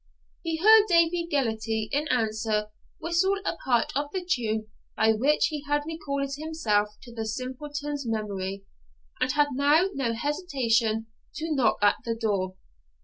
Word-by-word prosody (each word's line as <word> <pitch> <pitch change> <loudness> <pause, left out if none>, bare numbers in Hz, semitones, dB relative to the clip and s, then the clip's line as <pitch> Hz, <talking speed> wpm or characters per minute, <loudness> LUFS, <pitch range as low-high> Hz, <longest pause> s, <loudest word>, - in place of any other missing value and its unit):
He 330 -2 -2
heard 430 +4 +7
Davie 335 -1 +3
Gellatley 220 -5 0
in 295 +2 0
answer 220 -3 0 0.3
whistle 345 +4 +1
a - - -1
part 245 -6 +1
of 285 +1 -1
the 370 -2 -4
tune 220 -9 0 0.3
by 220 0 +4
which 275 +8 +2
he 300 -2 -4
had 290 0 +1
recalled 280 -4 -3
himself 215 -10 0
to 240 - -12
the 225 -1 -4
simpleton's 285 +4 -4
memory, 200 -3 -3 0.6
and 255 - +1
had 295 0 +3
now 290 +7 +3
no 245 -4 -1
hesitation 235 -5 0 0.3
to 320 0 -2
knock 265 -5 +2
at 205 - +5
the 230 -1 -2
door. 200 -5 -1
265 Hz, 145 wpm, -27 LUFS, 220-310 Hz, 0.6 s, heard